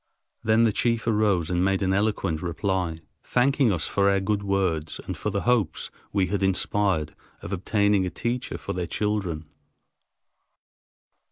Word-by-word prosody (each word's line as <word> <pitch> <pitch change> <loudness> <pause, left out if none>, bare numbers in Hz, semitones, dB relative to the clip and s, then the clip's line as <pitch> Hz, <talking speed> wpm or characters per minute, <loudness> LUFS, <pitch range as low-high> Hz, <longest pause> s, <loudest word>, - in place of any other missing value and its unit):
Then 110 +1 +4
the 115 - +4
chief 115 0 +1
arose 105 -7 +2
and 90 0 +1
made 95 +1 +1
an 95 0 +2
eloquent 95 -5 0
reply, 85 -1 -2 0.2
thanking 130 -1 +2
us 85 -4 -1
for 100 0 +2
our 100 0 +3
good 100 +1 0
words 95 -6 -1
and - - -4
for - - -3
the - - -1
hopes 120 -8 0 0.2
we 100 -2 +2
had 100 +2 -2
inspired 95 -4 +1 0.3
of - - -5
obtaining 100 0 +2
a - - -1
teacher 120 +6 -3
for - - -5
their 90 -1 -3
children. 95 -4 -2
100 Hz, 155 wpm, -25 LUFS, 90-105 Hz, 0.3 s, Then